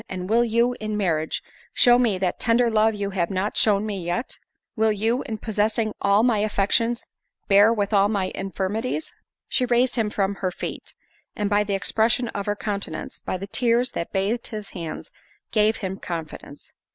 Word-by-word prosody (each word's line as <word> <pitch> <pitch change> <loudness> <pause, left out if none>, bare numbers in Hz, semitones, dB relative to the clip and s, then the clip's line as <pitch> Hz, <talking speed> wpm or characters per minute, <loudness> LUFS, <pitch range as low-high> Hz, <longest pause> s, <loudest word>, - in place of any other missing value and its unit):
and 185 -1 -5
will 235 +1 +5
you, 235 +2 +2
in 215 -1 -3
marriage, 160 -6 -1 0.3
show 245 -1 +6
me 225 -6 +2
that 185 -1 -1
tender 230 +1 +3
love 220 0 +3
you 200 -1 -3
have 175 -3 -1
not 195 +2 -2
shown 205 -1 +3
me 200 -4 -4
yet? 175 +9 -3 0.4
Will 220 0 +3
you, 225 +4 0
in 220 - -3
possessing 215 0 0
all 200 +2 +4
my 235 -4 +3
affections, 215 +3 +1 0.4
bear 205 +3 +6
with 210 -2 -1
all 200 0 +4
my 195 -3 -1
infirmities?" 200 +9 -3 0.3
She 255 - +1
raised 245 +1 +2
him 220 -2 +1
from 200 -1 0
her 185 - +1
feet, 180 - -7 0.4
and 210 -1 -2
by 205 0 +4
the 200 -1 -1
expression 225 +4 +1
of 200 -2 -5
her 205 - +1
countenance, 205 -1 -4
by - - -3
the 195 - -6
tears 240 +3 +1
that 170 - -4
bathed 205 +5 -1
his 215 -3 -7
hands, 165 -4 -7 0.4
gave 215 0 +3
him 190 -1 -5
confidence. 160 -4 -7
210 Hz, 180 wpm, -24 LUFS, 195-230 Hz, 0.4 s, show